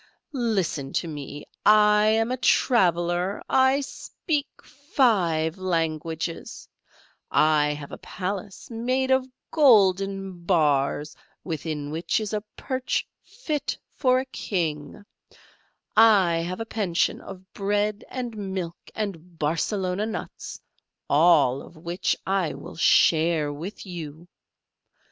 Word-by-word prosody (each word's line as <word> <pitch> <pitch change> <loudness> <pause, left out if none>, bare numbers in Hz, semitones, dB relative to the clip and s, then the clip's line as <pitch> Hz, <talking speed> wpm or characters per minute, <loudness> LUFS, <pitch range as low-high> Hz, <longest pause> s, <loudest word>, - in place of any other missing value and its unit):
Listen 195 - -1
to 170 - -1
me 145 -1 -7 0.2
I 210 0 +5
am 225 +2 +2
a 255 - -1
traveller 180 - +2
I 265 +1 +3
speak 290 +1 -3 0.2
five 195 - +1
languages, 165 -2 -3 0.6
I 150 -1 +3
have 145 -1 -9
a - - -8
palace 195 +1 -5
made 255 +3 0
of 260 0 +3 0.2
golden 195 - +3
bars, 150 -4 +1 0.3
within 155 -3 -4
which 165 +7 0
is 215 -1 -4
a 210 - -1 0.2
perch 260 -1 -2
fit 310 - -4
for 255 -2 +2
a 260 - -3
king, 170 - -4 0.9
I 205 -6 +6
have 175 +4 -3
a 225 - -3
pension 200 -6 0
of 190 -1 -12
bread 205 +1 -1
and 245 -3 -5
milk 190 -4 -4 0.2
and 180 -5 -5
Barcelona 180 +6 -1
nuts: 220 - -6 0.5
all 145 -4 +4
of 170 - -14
which 170 +3 -1
I 190 -4 0
will - - -10
share 160 -2 +3
with 175 +10 -7
you. 170 -2 -8
185 Hz, 110 wpm, -25 LUFS, 165-220 Hz, 0.9 s, I